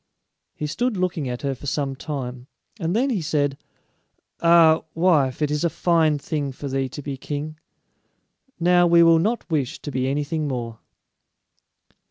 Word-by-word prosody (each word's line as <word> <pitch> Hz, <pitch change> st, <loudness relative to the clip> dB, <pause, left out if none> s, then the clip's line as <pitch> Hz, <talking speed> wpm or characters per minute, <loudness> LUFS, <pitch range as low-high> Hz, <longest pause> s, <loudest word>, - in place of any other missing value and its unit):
He 150 Hz, -, -4 dB
stood 230 Hz, +9 st, -1 dB
looking 175 Hz, -7 st, -1 dB
at 125 Hz, +2 st, -5 dB
her 140 Hz, -1 st, 0 dB
for 135 Hz, +2 st, -10 dB
some 140 Hz, -1 st, -1 dB
time, 130 Hz, -3 st, -6 dB, 0.3 s
and 170 Hz, +1 st, -1 dB
then 260 Hz, +4 st, +2 dB
he 205 Hz, -7 st, -1 dB
said, 145 Hz, -3 st, 0 dB, 0.9 s
"Ah, 165 Hz, -1 st, +6 dB
wife, 155 Hz, -6 st, +2 dB
it 150 Hz, -, 0 dB
is 150 Hz, +1 st, -1 dB
a 170 Hz, -, +2 dB
fine 160 Hz, -3 st, +2 dB
thing 145 Hz, -1 st, -3 dB
for 140 Hz, +2 st, -7 dB
thee 135 Hz, -1 st, -1 dB
to 145 Hz, -, -8 dB
be 140 Hz, -1 st, -5 dB
king; 150 Hz, +3 st, -5 dB, 1.0 s
now 175 Hz, 0 st, +4 dB
we 170 Hz, 0 st, +6 dB
will 165 Hz, -1 st, +6 dB
not 220 Hz, +7 st, -1 dB
wish 140 Hz, -6 st, -1 dB
to 145 Hz, -, -5 dB
be 130 Hz, 0 st, -1 dB
anything 150 Hz, +3 st, -1 dB
more." 120 Hz, -4 st, -4 dB
150 Hz, 165 wpm, -23 LUFS, 135-170 Hz, 1.0 s, Ah